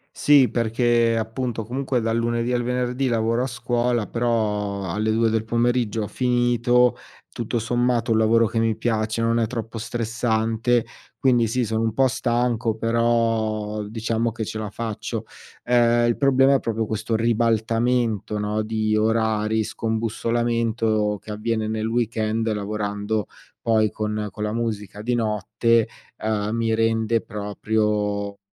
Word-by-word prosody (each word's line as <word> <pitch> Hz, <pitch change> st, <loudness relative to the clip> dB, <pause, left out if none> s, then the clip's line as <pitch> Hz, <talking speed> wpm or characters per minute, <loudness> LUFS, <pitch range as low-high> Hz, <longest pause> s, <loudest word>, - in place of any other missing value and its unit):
Sì, 145 Hz, -4 st, +5 dB
perché 115 Hz, 0 st, +2 dB
appunto, 115 Hz, +1 st, -3 dB
comunque 125 Hz, +2 st, -2 dB
dal 115 Hz, +1 st, 0 dB
lunedì 120 Hz, +1 st, 0 dB
al 120 Hz, -1 st, +1 dB
venerdì 125 Hz, +2 st, -1 dB
lavoro 115 Hz, 0 st, +1 dB
a -, -, -1 dB
scuola, 120 Hz, -2 st, -1 dB
però 105 Hz, -5 st, -1 dB
alle 105 Hz, +4 st, -1 dB
2 115 Hz, 0 st, +2 dB
del 110 Hz, 0 st, 0 dB
pomeriggio 120 Hz, -1 st, 0 dB
ho -, -, -4 dB
finito. 120 Hz, 0 st, +2 dB, 0.3 s
Tutto 120 Hz, 0 st, -2 dB
sommato, 120 Hz, +1 st, 0 dB
ho -, -, +4 dB
un -, -, +3 dB
lavoro 115 Hz, +1 st, +4 dB
che 115 Hz, +1 st, -1 dB
mi 115 Hz, -1 st, +1 dB
piace, 110 Hz, 0 st, -1 dB
non 115 Hz, +1 st, +2 dB
è 115 Hz, -, +1 dB
troppo 115 Hz, -1 st, -5 dB
stressante 115 Hz, +1 st, 0 dB, 0.3 s
quindi 120 Hz, -3 st, +3 dB
sì, 125 Hz, +3 st, 0 dB
sono 110 Hz, +1 st, -1 dB
un 110 Hz, -1 st, 0 dB
po' 135 Hz, +3 st, +3 dB
stanco, 120 Hz, -3 st, 0 dB
però 115 Hz, -2 st, 0 dB
diciamo 115 Hz, +2 st, -1 dB
che 115 Hz, 0 st, -4 dB
ce 110 Hz, -, -5 dB
la 110 Hz, -1 st, -4 dB
faccio. 110 Hz, -1 st, -4 dB, 0.4 s
Ehm, 120 Hz, -1 st, +3 dB
il 120 Hz, -, +1 dB
problema 135 Hz, 0 st, +4 dB
è -, -, +3 dB
proprio 110 Hz, -2 st, -2 dB
questo 110 Hz, +1 st, -2 dB
ribaltamento, 115 Hz, -1 st, +1 dB
no, 105 Hz, +1 st, -1 dB
di 110 Hz, 0 st, 0 dB
orari, 110 Hz, 0 st, +1 dB
scombussolamento 115 Hz, -1 st, -1 dB
che 110 Hz, -, -9 dB
avviene 110 Hz, +1 st, -2 dB
nel 110 Hz, 0 st, -2 dB
weekend 115 Hz, -1 st, 0 dB
lavorando 105 Hz, 0 st, -2 dB, 0.3 s
poi 110 Hz, -2 st, +2 dB
con 105 Hz, 0 st, -3 dB
con 105 Hz, -, -6 dB
la 105 Hz, -, -1 dB
musica 105 Hz, -3 st, -3 dB
di 125 Hz, +2 st, 0 dB
notte, 115 Hz, 0 st, +1 dB, 0.3 s
uhm, 105 Hz, -1 st, -1 dB
mi 115 Hz, -1 st, 0 dB
rende 115 Hz, 0 st, +1 dB
proprio 105 Hz, -1 st, -2 dB
115 Hz, 145 wpm, -23 LUFS, 110-120 Hz, 0.4 s, Sì